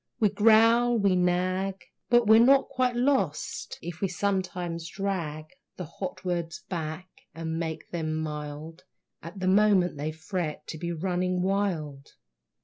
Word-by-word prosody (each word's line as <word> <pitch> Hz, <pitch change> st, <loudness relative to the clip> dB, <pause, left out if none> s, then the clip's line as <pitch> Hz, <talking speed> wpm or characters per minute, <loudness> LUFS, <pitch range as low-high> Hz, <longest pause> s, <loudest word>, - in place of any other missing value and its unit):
We 215 Hz, -3 st, +4 dB
growl, 230 Hz, +3 st, +5 dB
we 200 Hz, -3 st, +3 dB
nag, 185 Hz, +2 st, 0 dB, 0.3 s
But 240 Hz, -1 st, +5 dB
we're 220 Hz, +1 st, +7 dB
not 270 Hz, +3 st, +5 dB
quite 255 Hz, -2 st, 0 dB
lost 240 Hz, -, -1 dB
if 170 Hz, 0 st, -7 dB
we 195 Hz, -, +2 dB
sometimes 180 Hz, -3 st, -2 dB
drag 175 Hz, -6 st, -3 dB, 0.3 s
The 180 Hz, -, -6 dB
hot 180 Hz, +4 st, -7 dB
words 175 Hz, +2 st, -3 dB
back 165 Hz, 0 st, -4 dB, 0.3 s
and 165 Hz, 0 st, -3 dB
make 160 Hz, -2 st, -5 dB
them 160 Hz, -2 st, -2 dB
mild 155 Hz, +2 st, -6 dB, 0.4 s
At 170 Hz, +4 st, -9 dB
the 185 Hz, -, -1 dB
moment 190 Hz, -4 st, +4 dB
they 150 Hz, +2 st, -3 dB
fret 160 Hz, 0 st, -4 dB
to 160 Hz, -, -6 dB
be 170 Hz, +1 st, -3 dB
running 180 Hz, +1 st, -1 dB
wild. 170 Hz, -8 st, -2 dB
180 Hz, 145 wpm, -27 LUFS, 160-200 Hz, 0.4 s, we're